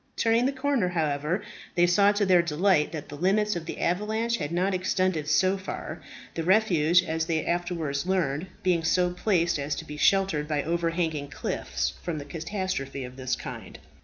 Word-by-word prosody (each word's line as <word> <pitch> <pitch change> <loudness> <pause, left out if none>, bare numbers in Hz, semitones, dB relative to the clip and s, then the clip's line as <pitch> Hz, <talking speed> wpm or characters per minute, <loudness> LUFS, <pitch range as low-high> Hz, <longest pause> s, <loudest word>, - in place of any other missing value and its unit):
Turning 230 +2 +3
the - - +1
corner, 270 -7 0
however, 155 +1 -1 0.3
they 175 - +5
saw 200 +4 +5
to 205 0 +1
their 180 -2 +5
delight 170 0 +2
that 155 -2 -6
the 145 - -8
limits 205 +6 +1
of 165 -1 -5
the - - -5
avalanche 220 +6 0
had 145 0 -4
not 185 +3 +1
extended 185 -3 0
so 185 +4 +3
far, 190 - -6 0.3
the 165 - -3
refuges, 180 -2 +4
as 160 0 -1
they 160 -2 0
afterwards 170 -4 -2
learned, 175 -3 0 0.2
being 175 -3 +2
so 180 +2 +2
placed 175 -4 +1
as 145 +1 -2
to - - -6
be 150 - -8
sheltered 190 -4 +2
by 150 -2 0
overhanging 165 -3 -1
cliffs 135 - -3
from 165 -3 -3
any 145 - -8
catastrophe 165 -5 -3
of 125 0 -8
this 130 -1 -2
kind. - - -8
175 Hz, 180 wpm, -27 LUFS, 155-190 Hz, 0.3 s, they